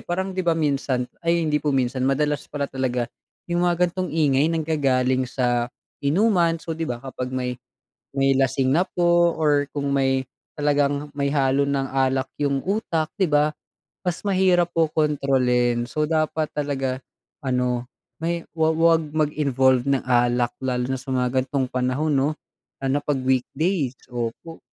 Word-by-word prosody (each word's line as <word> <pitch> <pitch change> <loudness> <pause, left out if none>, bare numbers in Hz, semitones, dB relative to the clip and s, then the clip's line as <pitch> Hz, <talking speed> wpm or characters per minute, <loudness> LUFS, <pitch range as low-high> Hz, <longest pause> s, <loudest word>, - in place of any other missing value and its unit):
parang 190 +2 -2
'di 185 - -2
ba 170 -2 +1
minsan 140 -4 0 0.2
ay, 170 0 +1
hindi 150 -1 +1
po 150 - -2
minsan, 130 -2 0
madalas 150 +2 0
pala 145 -1 -2
talaga 130 -3 -1 0.4
yung 175 0 -1
mga 175 +1 +2
ganitong 185 +1 -3
ingay, 150 -2 +2
nanggagaling 135 -6 +1
sa 120 -2 0 0.3
inuman. 170 +2 +3
So, 165 0 -6
'di 160 0 -3
ba 120 - -2
kapag 125 0 -6
may 125 -1 -3 0.6
may 135 0 +4
lasing 135 0 +2
na 165 - +4
po 175 -1 +3
or 145 -2 +2
kung 140 -1 -2
may 135 -1 +1 0.3
talagang 145 0 0
may 140 -1 0
halo 140 -1 +2
ng 135 -1 0
alak 135 0 +1 0.2
yung 140 -2 0
utak, 170 -6 -1
'di 185 - +3
ba, 150 +1 +3 0.5
mas 175 -1 -1
mahirap 185 -3 +3
po 165 -1 +2
kontrolin. 125 -5 +1
So, 150 +1 0
dapat 155 0 0
talaga 135 -3 -2 0.4
ano, 125 -2 -1 0.3
may 170 0 -2
wa 160 -1 +2
wag 165 0 +4
mag-involved 140 -4 +2
ng 135 -1 +1
alak 120 -1 +2
lalo 125 -1 -1
na 130 +1 -2
sa 135 - -11
mga 130 0 +1
ganitong 135 0 -1
panahon 130 +5 0
'no, 135 +1 +2 0.5
lalo 135 - -3
na 145 - +1
'pag 145 -1 -1
weekdays. 130 +3 0 0.2
Opo. 120 +8 -5
140 Hz, 160 wpm, -23 LUFS, 130-160 Hz, 0.6 s, may